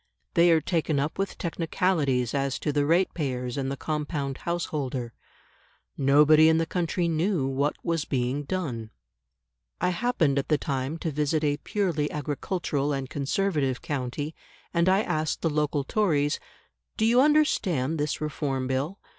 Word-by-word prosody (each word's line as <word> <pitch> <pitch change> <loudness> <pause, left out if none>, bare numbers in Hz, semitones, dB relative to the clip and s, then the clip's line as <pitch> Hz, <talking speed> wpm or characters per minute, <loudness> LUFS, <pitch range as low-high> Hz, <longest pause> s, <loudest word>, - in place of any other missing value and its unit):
They 170 0 +5
are 165 -1 +5
taken 160 -3 0
up 145 +6 -2
with 195 -1 -2
technicalities 160 - 0
as 140 -1 0
to 150 - -2
the 145 0 +1
ratepayers 140 -8 0
and 135 -1 -2
the 140 - -4
compound 150 -3 -3
householder. 140 -8 -3 0.8
Nobody 150 +3 +6
in 160 - +4
the 165 - +1
country 175 +1 -1
knew 165 -1 +1
what 135 +2 0
was 165 -2 0
being 130 +1 -1
done. 135 -12 -3 0.9
I - - +2
happened 175 - +1
at 140 - -3
the 150 - +3
time 135 +2 -2
to 165 -1 -3
visit 150 +2 0
a 145 -1 +1
purely 170 -8 -1
agricultural 150 0 -2
and 135 -2 -4
Conservative 145 -2 0
county, 145 +2 -3 0.4
and 170 +1 +3
I 195 +3 +3
asked 155 -4 -2
the 165 - +2
local 150 -1 0
Tories, 150 -5 +1 0.6
"Do 220 - +2
you 240 +3 +5
understand 185 - +2
this 150 0 -1
Reform 140 -3 -2
Bill? 135 +8 -2
150 Hz, 150 wpm, -27 LUFS, 140-170 Hz, 0.9 s, Nobody